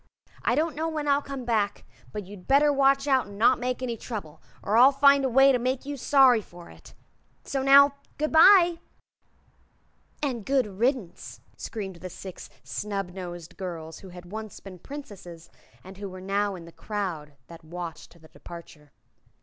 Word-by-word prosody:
I - - +1
don't 315 -1 0
know 320 +2 -2
when 305 -2 -4
I'll 285 0 +3
come 275 -3 -7
back, 210 -4 -1 0.3
but 205 +5 -6
you'd 195 -1 -13
better 285 +2 +4
watch 275 0 +3
out 265 -4 +2
an' 200 0 -11
not 235 +4 +4
make 250 +1 -3
any 240 -2 -2
trouble, 205 -9 -8 0.2
or 210 - 0
I'll 255 +4 +7
find 280 0 +5
a 265 - +1
way 270 +3 +6
to 250 - +1
make 255 +2 -2
you 290 0 -4
sorry 265 -3 +4
for 175 -3 -14
it. - - -16 0.5
So 270 - -3
now, 280 +1 +7 0.2
good 305 +1 -1
bye!" 345 0 +6 1.4
"And 250 -6 -2
good 270 +3 +1
riddance!" 210 -1 -3
screamed 195 -5 -6
the 185 +2 -8
Six 185 +1 -10
Snubnosed 180 -4 -6
Girls 165 -4 -7
who 190 - -12
had 175 0 -12
once 215 0 -7
been 185 -2 -12
Princesses, 195 - -10 0.3
and 190 +1 -12
who 200 -1 -6
were 185 0 -9
now 200 +1 -1
in 170 -2 -10
the 170 - -13
crowd 175 -8 -5
that 170 -1 -14
watched 170 0 -8
the 160 - -17
departure. 155 -4 -13
215 Hz, 175 wpm, -26 LUFS, 180-275 Hz, 1.4 s, I'll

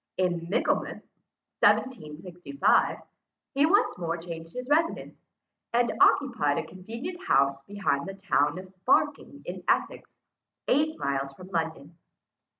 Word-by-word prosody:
In 175 -2 0
Michaelmas 195 - 0 0.6
1765, 180 - +1 0.6
he 280 +2 +4
once 405 +6 +3
more 170 -1 -2
changed 165 -1 -8
his 250 +4 -6
residence, 320 +4 +1 0.6
and 240 0 +3
occupied 225 - +4
a - - -2
convenient 230 - -7
house 140 0 +3
behind 190 -9 -1
the 195 - -6
town 185 -5 +1
of 185 0 -10
Barking - - +1
in - - -6
Essex, - - 0 0.5
eight 305 +4 +2
miles 140 -1 -2
from 185 +6 -12
London. 165 -2 -4
180 Hz, 120 wpm, -27 LUFS, 160-250 Hz, 0.6 s, he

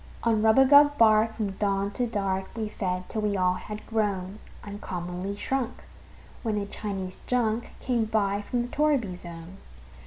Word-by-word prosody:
On 225 -2 +2
rubagub 280 +6 +6
bark, 220 0 +5
from 210 -3 -2
dawn 200 -1 0
to 245 +4 -1
dark, 195 -3 -2
We 220 -2 -2
fed, 185 -3 -3
till 220 - -3
we 205 -1 0
all 180 -1 +3
had 210 +3 -7
grown 205 -3 -1 0.2
Uncommonly 190 -2 -5
shrunk, 260 +3 -3 0.6
when 220 -3 -1
a 205 - -1
Chinese 195 -2 -5
junk 235 -2 0
Came 240 -3 0
by 205 -2 0
from 240 +3 -1
the - - -5
torriby 280 -8 +1
zone. 170 +1 -10
210 Hz, 155 wpm, -27 LUFS, 195-230 Hz, 0.6 s, rubagub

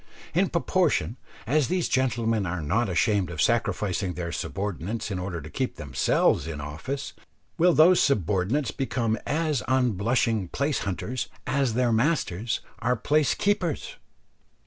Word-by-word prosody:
In 185 +4 +2
proportion 170 -8 +1 0.3
as 145 +4 +2
these 180 -1 0
gentlemen 115 -6 +1
are 85 -1 -3
not 115 +9 +1
ashamed 100 +1 +1
of 85 -3 -7
sacrificing 100 -2 0
their 85 -1 -4
subordinates 100 +4 -3
in 95 - -2
order 90 -2 -4
to 80 - -8
keep 130 -2 -2
themselves 70 +2 +1
in 80 -3 -5
office, 80 - -5 0.5
will 175 +1 +5
those 175 +4 +6
subordinates 105 - +1
become 120 -4 -1
as 155 -3 0
unblushing 115 -4 +1
place 140 - -1
hunters 110 +6 -3 0.2
as 135 -5 0
their 125 -1 +2
masters 115 - 0 0.2
are 125 +2 +1
place 145 +4 +2
keepers. 185 -6 -1
115 Hz, 135 wpm, -26 LUFS, 95-140 Hz, 0.5 s, those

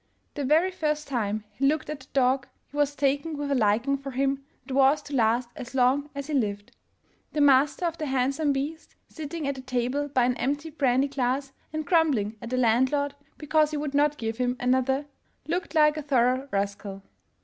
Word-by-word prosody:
The 290 - -3
very 320 +7 +3
first 300 -4 -2
time 215 -5 -1
he 270 +7 0
looked 305 +2 0
at 300 -1 -5
the 260 - -16
dog, 265 0 +2 0.2
he - - -13
was 290 -1 +1
taken 285 +3 0
with 285 -1 -3
a - - +3
liking 235 +4 +2
for 275 0 -7
him 275 +1 -1 0.2
that 265 - -6
was 275 +2 +4
to 290 - -9
last 235 0 +2
as 245 +1 -8
long 265 +3 +2
as 280 0 -4
he 305 - -5
lived. 205 -6 -2 0.6
The 300 - +1
master 285 +5 +4
of 335 0 -2
the 305 - -2
handsome 270 +3 +1
beast, 285 +4 -4
sitting 315 -1 -5
at 280 - 0
the 265 - -8
table 255 +2 -1
by 260 -3 +2
an 250 0 +1
empty 290 +4 -2
brandy 270 -2 +2
glass 270 0 -1 0.2
and 310 0 -3
grumbling 280 - +2
at 235 - -6
the 255 - -1
landlord 260 +4 +2 0.2
because 305 0 +2
he 305 - -3
would 290 -1 -3
not 295 +1 +2
give 225 -1 -4
him 250 0 0
another, 260 +3 +1 0.4
looked 340 +1 -3
like 300 -1 +5
a - - -2
thorough 260 -1 +1
rascal. 200 0 -3
275 Hz, 200 wpm, -26 LUFS, 250-295 Hz, 0.6 s, like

